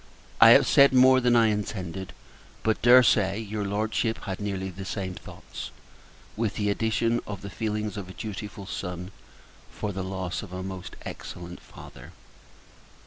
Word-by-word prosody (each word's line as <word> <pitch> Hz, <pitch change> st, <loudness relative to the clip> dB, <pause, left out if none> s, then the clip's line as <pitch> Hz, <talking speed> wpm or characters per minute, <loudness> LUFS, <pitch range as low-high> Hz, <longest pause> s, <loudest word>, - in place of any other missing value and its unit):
I -, -, +10 dB
have -, -, +8 dB
said 140 Hz, -1 st, +6 dB
more 130 Hz, 0 st, +7 dB
than 120 Hz, -1 st, +3 dB
I 115 Hz, -2 st, +5 dB
intended; 95 Hz, -3 st, -4 dB, 0.5 s
but 110 Hz, -1 st, +1 dB
dare 125 Hz, +1 st, +8 dB
say, 100 Hz, -3 st, +3 dB
your 105 Hz, -1 st, -4 dB
Lordship 110 Hz, +3 st, -1 dB
had 95 Hz, -1 st, -4 dB
nearly 95 Hz, -2 st, -3 dB
the 95 Hz, +2 st, -8 dB
same 95 Hz, -1 st, -4 dB
thoughts -, -, -9 dB, 0.7 s
with 110 Hz, -1 st, -1 dB
the 105 Hz, -2 st, 0 dB
addition 115 Hz, +2 st, 0 dB
of 100 Hz, -2 st, -6 dB
the 100 Hz, -, -7 dB
feelings 105 Hz, -2 st, -3 dB
of 95 Hz, -2 st, -6 dB
a -, -, -9 dB
dutiful 105 Hz, -1 st, -7 dB
Son, 90 Hz, -1 st, -5 dB, 0.6 s
for 105 Hz, -, -4 dB
the 95 Hz, 0 st, -4 dB
loss 95 Hz, -1 st, -4 dB
of 100 Hz, -, -10 dB
a 95 Hz, 0 st, -4 dB
most 95 Hz, -1 st, -7 dB
excellent 90 Hz, 0 st, -8 dB
Father. -, -, -13 dB
100 Hz, 160 wpm, -26 LUFS, 95-110 Hz, 0.7 s, I